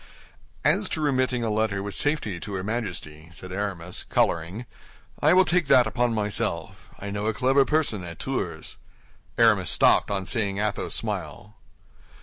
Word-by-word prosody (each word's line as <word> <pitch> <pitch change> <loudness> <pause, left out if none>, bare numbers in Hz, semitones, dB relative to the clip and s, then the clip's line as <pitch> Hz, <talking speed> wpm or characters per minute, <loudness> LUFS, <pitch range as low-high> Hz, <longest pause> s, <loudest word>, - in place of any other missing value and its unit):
"As - - +3
to - - -2
remitting 130 -4 +1
a 110 - 0
letter 105 -2 0
with 100 0 -4
safety 145 - 0
to 105 +3 -7
her 95 - -3
Majesty," 90 -8 -5
said 90 +3 -8
Aramis, 90 -3 -3
coloring, 85 +8 0 0.6
"I - - +5
will 185 0 +6
take 175 -4 +1
that 125 -2 +6
upon 120 +1 0
myself. 95 -4 -2
I 100 0 -6
know 105 +1 -2
a 110 - 0
clever 135 +6 +3
person 145 - +1
at 85 -2 -8
Tours—" 90 -12 -4 0.6
Aramis - - +4
stopped - - +4
on 95 -2 -2
seeing 100 -4 0
Athos 105 0 -2
smile. 105 +2 -5
105 Hz, 155 wpm, -25 LUFS, 95-125 Hz, 0.6 s, will